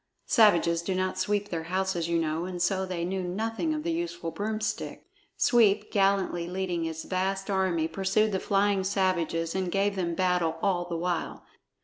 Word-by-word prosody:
(Savages 170 -7 +4
do 185 +2 -2
not 185 0 -1
sweep 205 0 0
their 165 -2 -3
houses, 185 -1 -1
you 170 - +2
know, 160 +1 -1
and 180 -1 -5
so 190 +2 +1
they 175 -2 -3
knew 190 +1 -2
nothing 225 - -2
of 305 -1 -2
the 335 - -1
useful 330 - -3
broomstick.) 215 +3 -3 0.3
Sweep, 215 -4 +3
gallantly 195 -4 +1
leading 180 -2 -2
his 160 0 -4
vast 195 +1 -2
army, 185 -4 +1
pursued 195 +5 +1
the 190 - 0
flying 200 0 +1
savages 180 -4 0
and 185 -2 -1
gave 200 +1 +1
them 170 -3 -1
battle 180 -3 +1
all 180 -3 +1
the 170 -1 -4
while. 175 0 -3
185 Hz, 170 wpm, -28 LUFS, 170-200 Hz, 0.3 s, Savages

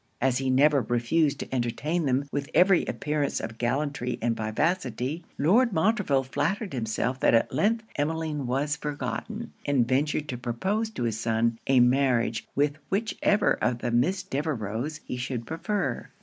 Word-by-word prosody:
As 130 0 +2
he 135 -1 -1
never 140 +2 +4
refused 135 +6 +1
to - - -7
entertain 140 +7 -1
them 135 +2 +1
with 140 0 -3
every 185 0 +5
appearance 150 -1 -1
of 115 0 -6
gallantry 130 0 -1
and 115 0 0
vivacity, 130 +5 -1
Lord 215 - +3
Montreville 180 - +2
flattered 155 - -2
himself 125 +2 -1
that - - +4
at 115 - +2
length 220 - +1
Emmeline 150 -2 -1
was 140 +4 0
forgotten; 180 +10 -5
and 135 -5 +2
ventured 145 +3 0
to 125 - -4
propose 190 - -1
to 220 - -5
his 110 -2 -1
son, 115 0 0
a 135 -2 +5
marriage 125 -2 +2
with 145 +1 +1
whichever 210 0 +2
of 125 -1 +2
the 120 0 -3
Miss 170 +11 +1
Devereux's 135 -1 -3
he 125 - -4
should 125 -2 -4
prefer. 200 - -2
140 Hz, 155 wpm, -27 LUFS, 120-160 Hz, -, every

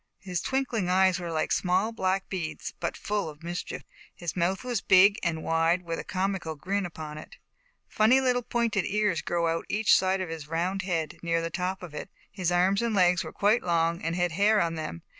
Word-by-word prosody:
His 180 -4 -4
twinkling 250 -8 -1
eyes 185 0 +3
were 170 -1 -5
like 160 -1 -1
small 185 +4 +1
black 190 -3 -1
beads, 175 -5 -5
but - - -3
full 205 -5 -2
of 150 +1 -13
mischief. 175 +1 -5 0.3
His 175 -2 -5
mouth 185 +4 0
was 245 -4 -2
big 200 +2 +6
and 160 -3 -2
wide, 165 +2 +2
with 165 -1 -4
a - - -4
comical 185 -3 -2
grin 190 +5 -2
upon 155 -2 -8
it. - - -12 0.5
Funny 225 +5 +4
little 250 -2 +2
pointed 230 -5 0
ears 210 -4 +1
grew 170 -1 0
out 165 0 +1
on - - -7
each 215 +1 +4
side 190 0 +2
of 185 -3 -3
his 160 -3 -6
round 175 +5 -1
head, 165 -5 -3
near 165 -1 0
the 165 0 -3
top 185 +2 -3
of 170 -4 -9
it. 150 - -6 0.2
His 185 -3 -1
arms 185 +3 +3
and 230 -2 0
legs 180 -2 +4
were - - -7
quite 210 +4 +2
long 170 -1 +1
and 165 +1 -2
had 175 -1 0
hair 205 +5 +3
on 170 -3 +1
them. 155 - -6
180 Hz, 215 wpm, -27 LUFS, 165-200 Hz, 0.5 s, big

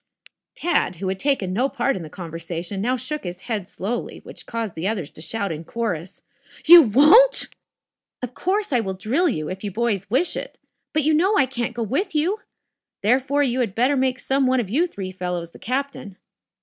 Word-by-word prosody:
Tad, 330 - 0
who 185 +3 -3
had 190 0 -3
taken 240 -10 0
no 250 +7 +1
part 275 0 0
in 185 - -5
the 160 - -8
conversation, 170 +2 -5
now 250 +4 +1
shook 295 +5 -5
his 180 0 -6
head 210 -6 -3
slowly, 220 +6 -4
which - - -11
caused 230 -5 -3
the 165 +4 -3
others 195 -9 -3
to - - -12
shout 200 +4 -3
in 160 0 -5
chorus: 185 -4 -4 0.4
"You 340 +1 +11
won't!" 310 - +6 0.7
"Of 250 0 -4
course 390 0 -1
I 245 - +4
will 190 -4 -3
drill 255 - +1
you, 155 - -3
if 190 +4 -6
you 205 - -2
boys 205 -2 -1
wish 265 +11 +1
it. - - -6 0.3
But, 310 -1 +1
you 310 +2 +3
know 380 +7 +3
I 275 - +5
can't 240 -2 -3
go 235 - -1
with 310 - -2
you. 355 +8 +1 0.6
Therefore, 265 +6 +2
you 255 -2 0
had 225 -6 -1
tetter 255 +5 +3
make 260 -1 +1
some 265 +1 +1
one 255 0 +3
of 205 -5 -3
you 325 +9 +2
three 190 - -6
fellows 180 -2 -4
the - - -15
captain." 255 -5 -4
235 Hz, 200 wpm, -23 LUFS, 190-280 Hz, 0.7 s, You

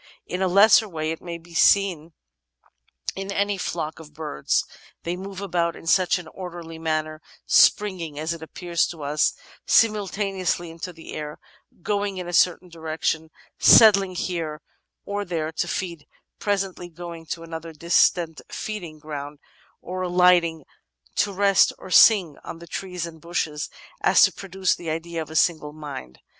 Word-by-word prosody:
In 180 - -4
a 190 - +3
lesser 205 +3 +6
way 155 -2 -3
it 160 - -6
may 170 -1 -6
be 170 +1 -17
seen 170 -3 +3 1.0
in 195 +1 -5
any 200 +1 0
flock 160 -3 -3
of 150 -2 -14
birds; 145 - -1 0.4
they 170 +1 -2
move 190 +1 -7
about 170 -3 -1
in - - -12
such 180 +3 +3
an 175 -2 -9
orderly 170 -3 -8
manner, 155 -1 -2 0.2
springing, 180 -8 +3
as 160 +2 -2
it 165 - -9
appears 170 +1 -1
to 160 -4 -8
us, 145 +1 +1 0.3
simul 215 -3 +4
taneously 185 -4 -2
into 170 +2 -7
the 165 -1 -11
air, 150 -1 -6 0.5
going 205 -2 -1
in 180 -1 -5
a 175 - -6
certain 180 +1 +3
direction, 160 -1 -3 0.3
settling 195 -4 +7
here 165 -4 -3 0.4
or 205 0 -2
there 165 -4 -3
to 170 +2 -2
feed, 170 -3 -4 0.3
presently 195 -3 -2
going 170 -1 -9
to 165 +2 -5
another 165 0 -7
distant 170 +1 +2
feeding 180 -8 -6
ground 145 -1 -7 0.4
or 185 +1 -5
alighting 175 -3 +3 0.5
to 205 - +2
rest 195 0 +4
or 185 - -11
sing 185 -8 +6
on 165 - -8
trees 180 -3 -4
and 160 -2 -10
bushes, 155 -3 -3 0.3
as - - +5
to - - +4
pro 195 - -10
duce 190 0 +1
the 170 - -6
idea 165 +1 -3
of 155 - -7
a 160 - -9
single 155 -2 +2
mind. 145 - -8
170 Hz, 160 wpm, -24 LUFS, 160-185 Hz, 1.0 s, settling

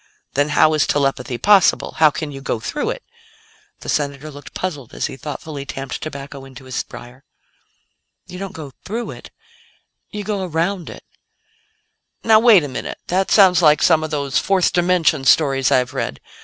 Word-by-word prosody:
"Then 145 +2 +1
how 155 0 +5
is 155 - +2
telepathy 135 -3 0
possible? 200 +4 +3
How 155 -1 +6
can 150 0 -5
you 135 -1 -8
go 120 - -2
through 295 - -3
it?" - - -5 0.8
The - - -10
Senator 145 +1 -2
looked 145 0 -12
puzzled 145 -10 -5
as - - -2
he - - -5
thoughtfully 145 0 -7
tamped 135 -2 -6
tobacco 140 -2 -7
into 130 -1 -13
his 130 -1 -3
briar. 125 +3 -12 1.0
"You 180 - -10
don't 195 -1 -5
go 150 -4 -9
through 230 +4 -4
it; - - -11 0.8
you 210 -1 -6
go 200 -1 -2
around 175 +1 -2
it." - - -11 1.2
"Now 220 -1 +6
wait 220 -7 +6
a - - -3
minute; 130 - -6
that 190 +2 +1
sounds 185 -4 +5
like 150 -3 +4
some 160 -2 +4
of 155 - -3
those 140 -3 0
fourth 190 -3 +1
dimension 175 -5 +2
stories 135 -2 +3
I've 125 +1 +2
read. 70 - -3
155 Hz, 170 wpm, -19 LUFS, 135-185 Hz, 1.2 s, How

